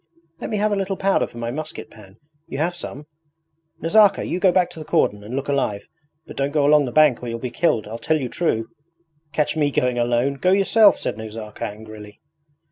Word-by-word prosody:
Let - - -5
me 215 - -1
have 210 +1 +1
a - - +2
little 195 -1 -2
powder 195 0 +1
for - - -14
my 120 0 -3
musket 155 +4 -7
pan 100 -2 -16 0.3
you - - -6
have 170 +4 -1
some? 150 -3 -8 0.8
Nazarka, 205 +4 +4
you 180 - -2
go 185 -1 +4
back 180 -1 +2
to - - -10
the - - -6
cordon 105 -8 0
and 110 +5 -6
look 135 +1 -3
alive; 130 -8 -1 0.4
but - - -11
don't 140 0 0
go 145 -1 +1
along 150 0 +5
the 125 - -4
bank 150 -4 +4
or 125 - -6
you'll 115 - -3
be 125 +1 -5
killed 120 -11 +1
I 110 +2 -6
tell 160 +6 0
you 130 - -3
true.' 115 -6 -1 0.6
'Catch 150 +1 0
me 150 -2 +2
going 125 -3 0
alone! 120 +3 +1
Go 185 +6 +2
yourself!' 200 +2 +5
said 105 - -4
Nazarka 110 -1 -7
angrily. 105 0 -10
140 Hz, 215 wpm, -22 LUFS, 115-170 Hz, 0.8 s, along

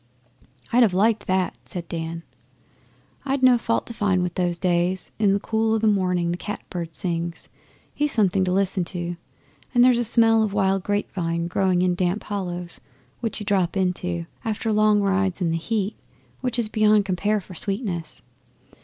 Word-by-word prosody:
'I'd 245 - +5
have 220 -6 +4
liked 215 +2 +2
that!' 185 -1 0
said 175 -2 -7
Dan. 165 0 -5 1.0
'I'd 275 -1 -1
no 255 -1 +7
fault 230 0 0
to 235 - -8
find 195 -5 +1
with 180 -1 -2
those 175 -1 0
days. 175 +1 0
In 205 -2 +4
the 200 - +2
cool 220 +1 0
o' - - +2
the 220 - -1
morning 180 -4 +2
the 175 - -2
cat 210 +3 -6
bird 170 -3 -5
sings. 170 0 -3 0.4
He's 295 0 0
something 195 -3 +2
to 180 - 0
listen 190 -1 +1
to. 175 -1 -4 0.6
And 245 - +6
there's 250 -1 +5
a - - +2
smell 225 -1 +4
of 215 -2 0
wild 195 -2 +2
grape 205 +2 -2
vine 170 -2 -1
growing 180 +1 +1
in 180 -1 +2
damp 180 +3 -1
hollows 180 -4 -5 0.4
which 230 -2 -3
you 210 - -6
drop 195 -3 +1
into, 180 -2 -1 0.2
after 225 -1 -2
long 210 0 +4
rides 195 -1 +1
in 170 -3 0
the 165 - 0
heat, 205 +3 -2 0.4
which 250 -2 -2
is 235 -2 +1
beyond 215 -1 +3
compare 200 +3 0
for 190 -1 -12
sweetness. 195 -2 -4
195 Hz, 180 wpm, -23 LUFS, 175-215 Hz, 1.0 s, no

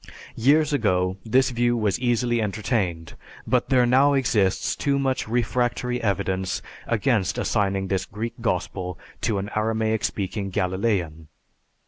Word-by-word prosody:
Years 150 +5 +3
ago 95 -7 +1
this 130 +4 +2
view 120 0 +1
was 105 -3 0
easily 120 -1 +1
entertained, 100 -6 -2 0.3
but - - +1
there 125 -2 +4
now 135 +4 +4
exists 110 -8 +1
too 140 -1 0
much 135 -3 -1
refractory 120 +1 0
evidence 95 -3 -1 0.2
against 115 -4 +1
assigning 95 -2 0
this 95 0 -1
Greek 115 +3 -5
Gospel 90 -4 -2 0.2
to 105 - 0
an 100 +2 -4
Aramaic 110 0 0
speaking 100 0 -2
Galilean. 90 -4 -1
110 Hz, 125 wpm, -24 LUFS, 95-120 Hz, 0.3 s, there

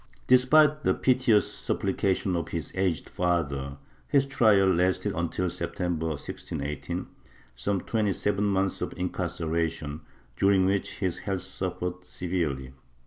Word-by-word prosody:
Despite 150 +4 +5
the - - +3
piteous 125 -5 +3
supplications 95 -1 0
of 85 -2 -2
his - - -4
aged 95 -4 0
father, 70 -6 -1 0.3
his 140 -1 +3
trial 110 -8 +4
lasted 90 +3 +1
until 85 +2 -1
September, 85 -1 -2
1618 75 -1 -4 0.3
— - - -28
some 95 +10 -1
twenty 105 -4 0
seven 105 +1 0
months 95 -1 0
of - - -3
incar 90 0 -2
ceration, 80 -2 -2 0.4
during 95 +4 +4
which 100 +1 0
his 90 -3 -1
health 95 -2 -2
suffered 90 -1 -4
severely. 80 -9 -3
90 Hz, 130 wpm, -27 LUFS, 85-100 Hz, 0.4 s, Despite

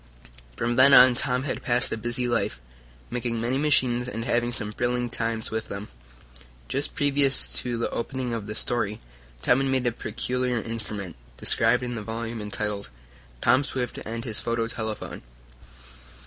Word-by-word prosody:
From 120 - -1
then 135 +1 +8
on 125 0 +9
Tom 125 +1 0
had 145 - -3
passed 120 0 +1
a - - +1
busy 120 +2 -1
life, 105 - 0 0.5
making 120 -1 -2
many 120 +4 0
machines 125 -4 +3
and 115 -1 -4
having 120 0 +1
some 105 -3 -4
thrilling 120 +1 -1
times 115 -2 -2
with 110 0 -2
them. 100 +1 -6 0.8
Just 140 - -1
previous 140 -1 +3
to 120 -1 -2
the 115 - 0
opening 125 0 -3
of 110 -3 -4
this 105 +1 -3
story 105 -4 0 0.4
Tom 125 - +4
had 135 0 +1
made 130 -1 +1
a 120 - +3
peculiar 125 +2 -1
instrument, 105 - -4 0.2
described 115 +2 +3
in 120 0 -3
the 110 - -4
volume 115 +1 -4
entitled 105 -3 -3 0.5
"Tom 130 +4 +5
Swift 125 -3 -3
and 115 +1 -5
His 110 -4 -2
Photo 115 -1 -1
Telephone." 110 -2 -4
120 Hz, 160 wpm, -26 LUFS, 110-125 Hz, 0.8 s, on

